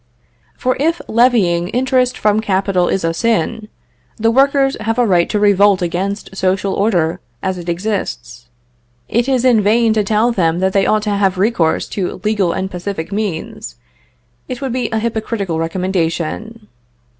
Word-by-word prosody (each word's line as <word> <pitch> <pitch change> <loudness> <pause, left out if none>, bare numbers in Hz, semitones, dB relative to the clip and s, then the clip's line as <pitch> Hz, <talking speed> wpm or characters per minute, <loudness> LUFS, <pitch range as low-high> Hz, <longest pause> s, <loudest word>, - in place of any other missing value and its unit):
For 255 0 0
if 330 +4 +1
levying 215 -8 +2
interest 250 +2 +1
from 210 0 +2
capital 190 -3 +1
is 190 - -1
a 165 0 0
sin, 220 +1 -1 0.5
the 225 +1 +2
workers 275 +2 +3
have 225 +2 -1
a 245 - +3
right 175 -5 +2
to 210 - 0
revolt 205 -2 +4
against 190 +3 -3
social 190 +1 0
order, 180 -6 +1 0.2
as 190 -1 -2
it 175 0 -6
exists; 170 - -4 0.6
it 235 +3 0
is 260 -2 +1
in 240 -4 +5
vain 220 +2 +3
to 215 -1 +1
tell 215 +4 +2
them 170 -6 +1
that 190 +1 0
they 195 -1 +2
ought 215 -1 +2
to 210 - -1
have 200 -2 +1
recourse 190 -5 +1
to 190 -3 -3
legal 210 -5 +1
and 190 +2 -3
pacific 180 -1 -5
means, 195 - -4 0.7
it 250 -1 -4
would 270 -3 -3
be 255 0 -1
a 220 - -1
hypocritical 220 -6 -2
recommendation. 185 +5 -3
205 Hz, 160 wpm, -17 LUFS, 180-230 Hz, 0.7 s, in